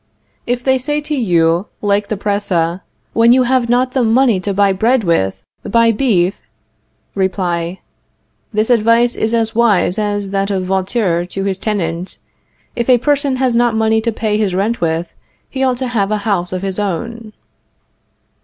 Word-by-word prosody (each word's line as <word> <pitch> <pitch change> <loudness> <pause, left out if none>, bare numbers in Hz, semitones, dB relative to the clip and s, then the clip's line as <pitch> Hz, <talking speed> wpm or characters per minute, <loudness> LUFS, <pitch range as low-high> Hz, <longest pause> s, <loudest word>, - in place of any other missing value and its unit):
If 245 0 -1
they 265 0 +2
say 295 +3 -1
to 300 0 -3
you, 175 -6 +1
like 205 0 0
the 215 - -3
Presse: 190 -4 -1 0.3
When 230 +1 +4
you 255 0 +4
have 250 -1 +1
not 250 +1 +2
the 260 -1 +1
money 230 -2 +3
to 200 +2 -3
buy 200 0 +2
bread 230 +5 +1
with, 95 - 0 0.2
buy 230 +2 +3
beef 205 -6 +1 0.7
Reply: 180 -2 -2 0.7
This 215 +2 0
advice 235 +1 +3
is 220 - -1
as 225 -1 0
wise 215 -4 +2
as 205 -2 -2
that 195 0 -1
of 190 -2 -1
Vautour 185 -2 0
to 195 +2 -4
his 195 -1 -2
tenant, 180 -4 -3 0.6
"If 235 +1 -2
a 250 - +6
person 285 +1 +1
has 255 -2 0
not 240 -1 +2
money 220 0 +2
to 230 +1 -1
pay 215 -1 -1
his 195 -4 0
rent 210 +4 -1
with, 165 0 -1 0.3
he 265 -1 -3
ought 255 -2 +1
to 260 0 -3
have 205 -5 0
a 215 - 0
house 180 -5 0
of 185 0 -4
his 195 0 -2
own." 215 +3 -4
210 Hz, 170 wpm, -16 LUFS, 190-235 Hz, 0.7 s, a